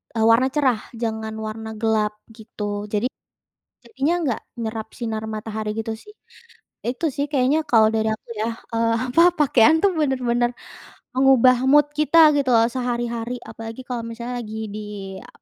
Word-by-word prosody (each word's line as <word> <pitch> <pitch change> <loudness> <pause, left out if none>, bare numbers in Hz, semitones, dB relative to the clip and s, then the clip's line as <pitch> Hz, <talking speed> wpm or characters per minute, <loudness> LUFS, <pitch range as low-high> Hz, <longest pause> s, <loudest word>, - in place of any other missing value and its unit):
eee, 220 - +2
warna 230 +3 +5
cerah, 265 -6 +2 0.2
jangan 220 -1 -3
warna 220 0 -6
gelap 215 -1 +1 0.2
gitu. 210 -2 -5
Jadi, 215 +3 +1 0.8
jadinya 335 -5 0
enggak 255 -8 -1 0.2
nyerap 220 -1 -4
sinar 220 -2 -3
matahari 215 0 -4
gitu 225 0 -3
sih. 225 - -14 0.7
Nah, 240 - -1
itu 325 +6 -2
sih 285 +2 -2
kayaknya 275 +3 +2
kalau 225 -6 +5
dari 220 0 +1
aku 220 - -16
ya, 220 - 0 0.3
eee, 230 0 +2 0.2
apa 330 +7 +5
pakaian 295 0 +5
tuh 400 - +5
bener-bener 245 -4 +1 0.7
mengubah 260 -1 +5
mood 295 0 +6
kita 305 +2 +3 0.2
gitu 280 -2 0
loh 225 0 +5
sehari-hari 240 -1 -3
apalagi 225 +2 -8
kalau 245 -2 -3
misalnya 235 +2 -6
lagi 215 0 -7 0.2
di 215 - -5 0.4
a - - -15
235 Hz, 155 wpm, -22 LUFS, 220-260 Hz, 0.8 s, mood